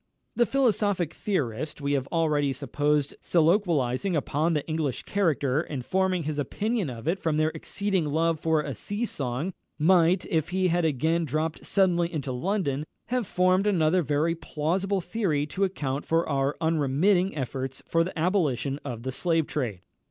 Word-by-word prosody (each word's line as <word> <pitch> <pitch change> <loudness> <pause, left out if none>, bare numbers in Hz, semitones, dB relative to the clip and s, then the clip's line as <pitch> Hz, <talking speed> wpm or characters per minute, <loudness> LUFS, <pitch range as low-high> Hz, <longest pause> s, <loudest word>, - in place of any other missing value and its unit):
The 240 - +3
philosophic 205 - +1
theorist 150 - -2
we 140 0 -2
have 135 -2 0
already 150 -4 +1
supposed 145 +2 0
soliloquising 170 - +2
upon 155 +3 0
the 150 -3 -1
English 155 -5 -2
character, 155 -8 +1
and 135 -7 -6
forming 185 -2 +1
his 150 0 -3
opinion 210 - -1
of 120 +2 -8
it 180 +4 +1
from 160 -2 0
their 155 0 +3
exceeding 195 0 -2
love 160 +2 +1
for 160 -1 +2
a 140 -2 -4
sea 205 - -3
song, 140 - -3 0.2
might, 175 +2 +4
if 160 -3 0
he 185 0 +1
had 175 0 +1
again 160 +3 +1
dropped 155 +2 -2
suddenly 175 -3 +2
into 140 -5 -3
London, 145 0 -1 0.3
have 250 -4 0
formed 185 +2 +2
another 180 -2 +3
very 150 +2 +1
plausible 180 +5 -1
theory 170 -7 0
to 185 +6 -2
account 145 -7 -3
for 165 +1 +1
our 140 0 0
unremitting 165 +4 +2
efforts 130 0 -4
for 165 0 +3
the 180 0 -6
abolition 150 - 0
of 120 -5 -6
the 130 - -3
slave 165 +3 +1
trade. 120 -13 -3
160 Hz, 160 wpm, -27 LUFS, 145-185 Hz, 0.3 s, might